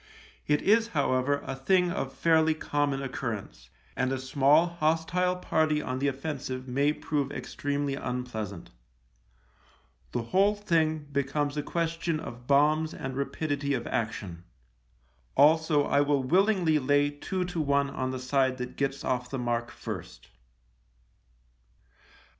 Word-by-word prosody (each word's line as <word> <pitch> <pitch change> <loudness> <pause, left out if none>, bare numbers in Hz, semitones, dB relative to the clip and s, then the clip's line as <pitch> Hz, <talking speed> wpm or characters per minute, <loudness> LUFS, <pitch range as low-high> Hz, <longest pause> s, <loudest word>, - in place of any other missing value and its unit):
It 150 0 +2
is, 225 +3 +4
however, 140 +1 +1
a - - -4
thing 180 +6 +2
of 135 -6 -3
fairly 160 0 +3
common 145 -3 -1
occurrence, 105 - -5 0.3
and 130 0 0
a 135 - 0
small 140 +4 +4
hostile 170 +2 0
party 155 -4 +1
on 130 -3 -3
the 140 - +1
offensive 135 -2 -4
may 140 +4 +2
prove 145 -3 -2
extremely 145 -1 -3
unpleasant. 115 - -5 1.4
The 120 - -2
whole 195 - +3
thing 160 -6 0
be 140 0 +2
comes 145 +1 -2
a 150 - 0
question 165 +1 -2
of 120 -4 -9
bombs 155 +3 +3
and 135 -1 -5
rapidity 140 0 -1
of 120 - -4
action. 100 -7 -3 0.9
Also, 155 -1 +5
I 140 0 +2
will 145 -2 +2
willingly 180 0 +3
lay 145 +1 +2
two 180 +5 -3
to 180 -2 -2
one 140 -1 +1
on 130 -1 -2
the 130 - -3
side 130 0 +1
that 125 0 -6
gets 140 0 -1
off 125 -1 -1
the 135 - -3
mark 120 -1 -1
first. - - -8
145 Hz, 135 wpm, -28 LUFS, 130-160 Hz, 1.4 s, Also